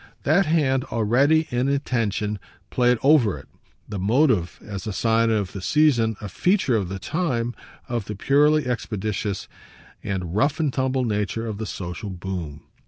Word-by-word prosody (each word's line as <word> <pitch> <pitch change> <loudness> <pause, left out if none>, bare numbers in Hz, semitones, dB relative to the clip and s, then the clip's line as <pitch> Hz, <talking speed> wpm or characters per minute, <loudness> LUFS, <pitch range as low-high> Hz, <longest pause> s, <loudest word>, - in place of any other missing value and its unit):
That 160 +5 +3
hand 135 -5 +2
already, 135 +9 +2
in 125 +2 +1
intention, 110 -7 -1 0.3
played 125 -1 +3
over 135 - +4
it, - - -13 0.4
the 105 -2 -5
"motive," 110 - +2
as 105 0 -6
a 105 - -2
sign 115 +2 +2
of 105 -4 0
the 100 - -7
season, 120 -4 +3
a 105 - -6
feature 175 - +1
of 100 -5 -1
the 95 - -4
time, 120 - -1 0.3
of 120 -4 -2
the 105 - -5
purely 145 +6 +3
expeditious 105 -3 -3 0.6
and 90 -4 -3
rough 145 +9 +1
and 150 -5 0
tumble 130 -1 0
nature 105 0 -1
of 110 -2 -5
the 110 - -4
social 90 +3 -5
boom. 90 -5 -6
115 Hz, 160 wpm, -23 LUFS, 100-135 Hz, 0.6 s, over